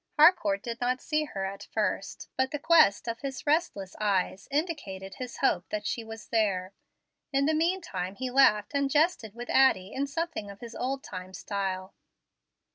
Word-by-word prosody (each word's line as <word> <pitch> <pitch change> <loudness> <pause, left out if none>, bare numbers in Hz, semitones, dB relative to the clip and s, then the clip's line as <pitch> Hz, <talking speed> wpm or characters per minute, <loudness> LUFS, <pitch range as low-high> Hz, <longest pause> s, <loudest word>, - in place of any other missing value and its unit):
Harcourt 295 - +5
did 235 0 -5
not 250 +1 +1
see 305 +2 0
her 195 -9 -4
at 195 +1 -6
first, - - -2
but 260 0 +1
the 295 - -3
quest 300 -9 +5
of 230 0 -3
his 270 -3 -5
restless 290 - 0
eyes 195 -2 0
indicated 275 - -3
his 250 -1 -6
hope - - +1
that 315 0 -3
she 235 - -2
was 225 0 -10
there. 195 -4 +1 0.6
In 275 0 +2
the 315 - +2
mean 340 +4 +1
time 185 - -4
he 255 +3 -4
laughed 215 -6 +4
and 280 -1 +1
jested 295 - +1
with 240 +1 -6
Addie 210 -8 +4
in 280 +1 -1
something 325 -8 -3
of 200 0 -10
his 235 -1 -9
old 270 +3 -3
time 185 0 -8
style. 190 -2 -3
240 Hz, 180 wpm, -29 LUFS, 200-285 Hz, 0.6 s, Harcourt